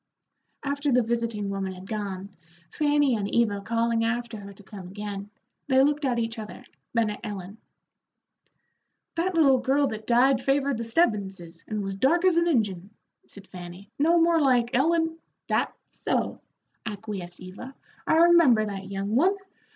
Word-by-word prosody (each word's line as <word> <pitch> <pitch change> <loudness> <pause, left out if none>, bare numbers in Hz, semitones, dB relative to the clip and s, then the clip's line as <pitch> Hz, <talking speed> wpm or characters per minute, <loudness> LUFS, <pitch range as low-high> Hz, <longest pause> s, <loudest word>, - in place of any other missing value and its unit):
After 285 0 -1
the 250 -1 +4
visiting 230 -3 -2
woman 195 -1 -3
had 185 +1 -11
gone, 200 -2 -4 0.4
Fanny 290 -3 +2
and 205 -2 -2
Eva 210 -4 +1
calling 230 +1 0
after 235 0 -2
her 200 -1 -9
to 200 +1 -16
come 190 -1 -10
again, 200 +1 -6 0.4
they 265 -1 +5
looked 295 +1 +1
at 250 -3 +1
each 230 0 -2
other, 215 -1 -9 0.3
then 230 -2 +1
at 210 - -7
Ellen. 205 -1 -7 1.5
"That 350 +2 -1
little 275 -5 +5
girl 275 +3 +2
that 215 0 -7
died 250 +2 +4
favored 275 -1 +1
the - - -2
Stebbinses, 195 - -1
and 215 -1 -3
was 195 0 -4
dark 335 - +3
as 360 -3 +4
an 340 0 +3
Injun," 205 - 0 0.4
said 200 -1 -12
Fanny, 180 +3 -10
"no 335 +4 +4
more 335 -1 +4
like 245 -4 +3
Ellen 325 +4 +1
" - - -55
"That's - - 0
so," - - -2 0.4
acquiesced 200 -4 -6
Eva; 200 +9 -10 0.3
"I - - +4
remember 330 -10 +6
that 195 -2 -6
young 200 +2 -2
one. 365 +10 +4
230 Hz, 160 wpm, -26 LUFS, 200-280 Hz, 1.5 s, remember